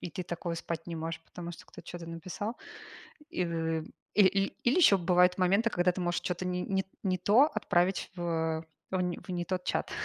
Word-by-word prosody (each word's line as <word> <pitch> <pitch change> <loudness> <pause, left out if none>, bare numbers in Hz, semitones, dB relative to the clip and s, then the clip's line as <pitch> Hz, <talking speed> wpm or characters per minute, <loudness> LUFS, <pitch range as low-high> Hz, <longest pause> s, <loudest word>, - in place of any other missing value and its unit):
и 175 - -5
ты 185 - -3
такого 170 -1 -4
спать 165 0 -5
не 170 - -4
можешь, 165 +1 -4
потому 175 0 -7
что 170 - -11
кто-то - - -12
чё-то 175 -1 -8
написал. 185 +7 -5 0.7
И 260 - 0
в 165 -1 -1 0.3
и - - +4
или 195 +1 +3 0.2
или 245 - +3
ещё 305 - +7
бывают 180 +1 +4
моменты, 195 +5 +3
когда 180 -2 +3
ты 185 - -5
можешь 175 0 0
чё-то 180 0 -3
не 180 0 -1
не 190 0 0 0.2
не 185 -2 +1
то 210 +9 +6
отправить 185 -3 +1
в 165 -2 -1 0.3
в - - -4
н 180 -1 +1
в - - -10
не 175 -1 -1
тот 180 0 -2
чат. - - -1
180 Hz, 210 wpm, -31 LUFS, 170-190 Hz, 0.7 s, ещё